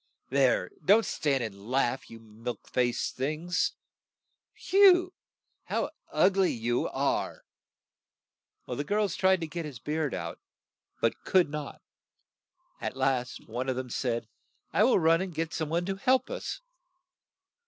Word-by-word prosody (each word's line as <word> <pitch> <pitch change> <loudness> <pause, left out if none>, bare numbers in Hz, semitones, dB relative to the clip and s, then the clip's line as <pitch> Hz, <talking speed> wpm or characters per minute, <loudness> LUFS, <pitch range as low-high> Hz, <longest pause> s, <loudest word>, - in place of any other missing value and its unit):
There, 130 -8 +2
don't 210 +8 +5
stand 135 -4 0
and 100 -1 -7
laugh, 130 0 0
you 115 - -10
milk 115 +1 -7
faced 120 -1 0
things! 155 +7 0 1.0
Whew! 370 -2 +6 0.5
how - - -1 0.2
ug 195 0 +3
ly 190 - +5
you 120 -1 0
are! - - -1 0.4
' - - -65
' - - -52
The 125 +4 -3
girls 205 +1 0
tried 190 -1 +3
to 165 - -2
get 170 +2 -4
his 145 -5 -7
beard 150 +4 -2
out, 85 -2 -5 0.6
but - - 0
could 180 -6 +3
not. 150 -1 -6 1.0
At - - -4
last 130 -2 -1
one 125 +4 -3
of 130 - 0
them 130 -1 -5
said, 115 -3 -1 0.5
"I 180 - +3
will 255 - +5
run 165 0 +4
and 185 -4 -5
get 165 +1 -2
some 160 -2 -2
one 170 +2 0
to 195 +1 -2
help 255 +5 +2
us." - - -4
150 Hz, 150 wpm, -29 LUFS, 125-185 Hz, 1.0 s, Whew